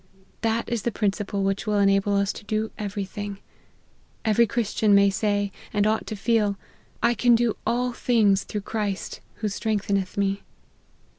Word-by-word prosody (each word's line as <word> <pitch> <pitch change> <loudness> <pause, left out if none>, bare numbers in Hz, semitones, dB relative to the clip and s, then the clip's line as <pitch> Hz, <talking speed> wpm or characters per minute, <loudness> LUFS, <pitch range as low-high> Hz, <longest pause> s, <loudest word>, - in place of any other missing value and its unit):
That 225 +1 0
is 235 -2 -1
the 235 - -1
principle 200 -1 -1
which 195 +2 -1
will 210 -1 +2
enable 195 0 +3
us 200 0 +1
to - - -10
do 215 +1 -2
every 205 -1 -3
thing. 205 +1 -6 0.9
Every 225 +2 +4
Christian 215 -1 +2
may 200 0 +5
say, 205 0 0 0.2
and 205 -1 +1
ought 220 +1 +1
to 215 - -4
feel, 210 -1 +1 0.2
" - - -23
I 235 0 +4
can 240 0 +4
do 230 -1 +1
all 245 +1 +1
things 210 -6 +3
through 210 - -4
Christ, 205 -2 -3
who 215 - -2
strengtheneth 200 -2 -1
me." 200 0 0
205 Hz, 165 wpm, -25 LUFS, 200-225 Hz, 0.9 s, may